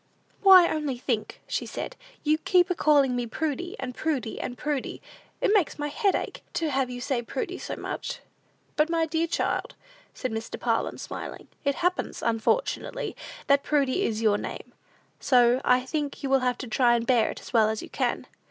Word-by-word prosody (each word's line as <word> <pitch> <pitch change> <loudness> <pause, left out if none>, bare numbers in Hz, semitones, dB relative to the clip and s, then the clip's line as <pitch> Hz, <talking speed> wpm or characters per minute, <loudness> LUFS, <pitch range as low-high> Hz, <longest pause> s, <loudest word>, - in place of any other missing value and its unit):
"Why; 375 -3 +9
only 300 -5 -2
think," 235 -4 -3
said - - -4 0.3
she, 300 - +1
"you 310 - +3
keep 360 +2 +3
a - - +4
calling 285 -6 +3
me 245 -1 -2
Prudy, 320 +8 -3
and 250 -2 -4
Prudy, 265 -6 -2
and 245 - -5
Prudy. 295 -3 -3 0.4
It 415 - +3
makes 395 -7 +2
my 295 0 -2
head 395 +6 +1
ache, - - -4
to 320 -3 0
have 265 -1 +1
you 245 0 -5
say 255 -1 -1
Prudy 370 - -4
so - - -5
much." - - -5 0.6
"But, 305 +2 +2
my 330 -1 +2
dear 325 +1 0
child," 335 - -1 0.4
said 255 - -3
Mr. 225 0 -5
Parlin, - - 0
smiling, - - -7
"it 280 -1 +1
happens, 360 0 -1
unfortunately, 360 - 0 0.3
that 280 0 +4
Prudy 285 +4 +1
is 225 - -1
your 205 -2 +3
name; - - -7 0.5
so 245 -1 +4
I 250 0 +3
think 290 0 -3
you 270 - -1
will 270 - +5
have 250 -1 0
to 255 - -6
try 240 +1 +3
and 235 -1 -1
bear 235 -3 +3
it - - -6
as - - -12
well 220 -2 +5
as 220 0 -3
you - - -9
can." - - -1
275 Hz, 190 wpm, -27 LUFS, 245-320 Hz, 0.6 s, Why